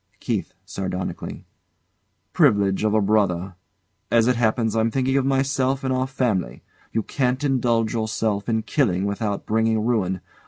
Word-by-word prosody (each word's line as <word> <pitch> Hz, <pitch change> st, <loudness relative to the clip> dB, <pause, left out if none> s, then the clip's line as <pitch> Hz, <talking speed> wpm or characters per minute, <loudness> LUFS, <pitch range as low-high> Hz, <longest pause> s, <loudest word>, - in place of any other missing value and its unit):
KEITH. -, -, -3 dB
[Sardonically] 95 Hz, -1 st, -5 dB, 0.9 s
Privilege 100 Hz, -1 st, +3 dB
of 110 Hz, 0 st, +2 dB
A 110 Hz, -, +4 dB
brother. 100 Hz, -3 st, +1 dB, 0.6 s
As 115 Hz, -1 st, +4 dB
it 125 Hz, +1 st, +3 dB
happens, 115 Hz, -1 st, +1 dB
I'm 110 Hz, 0 st, +2 dB
thinking 130 Hz, +2 st, 0 dB
of 135 Hz, -1 st, +2 dB
myself 135 Hz, 0 st, +1 dB
and 130 Hz, -1 st, 0 dB
our 130 Hz, 0 st, 0 dB
family. 110 Hz, -, -1 dB, 0.3 s
You 110 Hz, -, -1 dB
can't 130 Hz, +2 st, -1 dB
indulge 120 Hz, -5 st, +1 dB
yourself 110 Hz, -2 st, -1 dB
in 110 Hz, -1 st, 0 dB
killing 100 Hz, -, +1 dB
without 100 Hz, 0 st, -2 dB
bringing 110 Hz, 0 st, +1 dB
ruin. 95 Hz, -6 st, 0 dB
110 Hz, 145 wpm, -23 LUFS, 100-130 Hz, 0.9 s, A